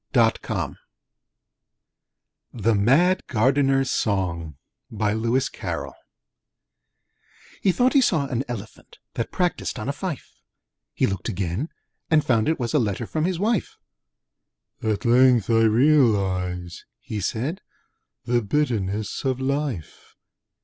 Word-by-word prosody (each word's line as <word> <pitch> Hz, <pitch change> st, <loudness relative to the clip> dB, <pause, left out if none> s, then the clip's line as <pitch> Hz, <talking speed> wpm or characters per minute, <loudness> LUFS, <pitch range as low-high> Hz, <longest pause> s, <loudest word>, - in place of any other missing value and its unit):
(Poem 115 Hz, -3 st, +5 dB, 0.2 s
#265) -, -, -2 dB, 1.8 s
The 115 Hz, 0 st, +1 dB
Mad 140 Hz, -, +3 dB
Gardener's 135 Hz, +3 st, +2 dB
Song 85 Hz, -, -1 dB, 0.3 s
He 110 Hz, -2 st, -8 dB, 2.7 s
thought 245 Hz, +9 st, +2 dB
he 275 Hz, -, +6 dB
saw 160 Hz, -, +2 dB
an 130 Hz, -2 st, -2 dB
Elephant, 115 Hz, -3 st, -8 dB, 0.2 s
That 115 Hz, -, -3 dB
practised 180 Hz, -6 st, -1 dB
on 110 Hz, -, -5 dB
a 140 Hz, -, -1 dB
fife: 155 Hz, -2 st, -6 dB, 0.5 s
He -, -, +2 dB
looked 95 Hz, +2 st, -3 dB
again, 95 Hz, -, -2 dB, 0.4 s
and 155 Hz, -2 st, +3 dB
found 115 Hz, 0 st, +2 dB
it 160 Hz, -, 0 dB
was 120 Hz, -2 st, -2 dB
A 150 Hz, -, +4 dB
letter 110 Hz, -1 st, -1 dB
from 155 Hz, +7 st, -1 dB
his 185 Hz, -1 st, -1 dB
wife. 210 Hz, +1 st, -1 dB, 1.0 s
'At 110 Hz, 0 st, -1 dB
length 120 Hz, -2 st, +4 dB
I 115 Hz, 0 st, +4 dB
realise,' 100 Hz, -, +2 dB, 0.2 s
he 105 Hz, -, -5 dB
said, 130 Hz, -, -2 dB, 0.6 s
The 120 Hz, 0 st, +2 dB
bitterness 105 Hz, -5 st, -1 dB
of 130 Hz, -2 st, 0 dB
Life!' 135 Hz, -, -3 dB
120 Hz, 115 wpm, -24 LUFS, 105-145 Hz, 2.7 s, he